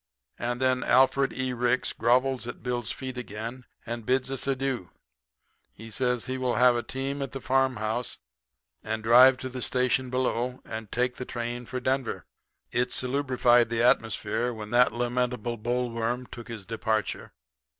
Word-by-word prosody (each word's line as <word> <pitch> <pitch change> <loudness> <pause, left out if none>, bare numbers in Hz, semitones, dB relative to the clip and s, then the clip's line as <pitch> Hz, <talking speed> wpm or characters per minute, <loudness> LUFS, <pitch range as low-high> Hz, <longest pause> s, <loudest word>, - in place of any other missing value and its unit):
"And 120 +1 -2
then 130 -1 +2
Alfred 135 +1 +4
E. 130 -1 -2
Ricks 125 +1 +1
grovels 125 +1 +2
at 120 - -7
Bill's 120 -3 -2
feet 130 -2 -5
again, 120 +2 -6 0.2
and 120 0 -4
bids 130 +3 0
us 135 - -3
adieu. 135 -8 -1 0.8
He 115 +1 -11
says 125 -1 0
he 130 0 -3
will 125 -2 0
have 125 -1 +5
a 120 - 0
team 135 +3 -4
at 135 -1 -5
a - - -3
farmhouse, 125 -3 0 0.7
and 110 0 -3
drive 125 +3 +7
to 130 - -5
the 130 0 -6
station 125 +1 +1
below, 125 0 -1
and 110 -2 -7
take 125 +1 0
the - - -4
train 120 0 -4
for 130 - -3
Denver. 130 0 -1 0.5
It 125 +1 +1
salubrified 125 -3 +3
the 115 0 +1
atmosphere 115 0 +2
when 110 -2 -7
that 125 +1 +5
lamentable 120 0 -1
boll 120 +2 -1
worm 115 +2 -2
took 120 -1 -10
his 110 -4 -7
departure. 110 0 -2
125 Hz, 160 wpm, -27 LUFS, 115-130 Hz, 0.8 s, drive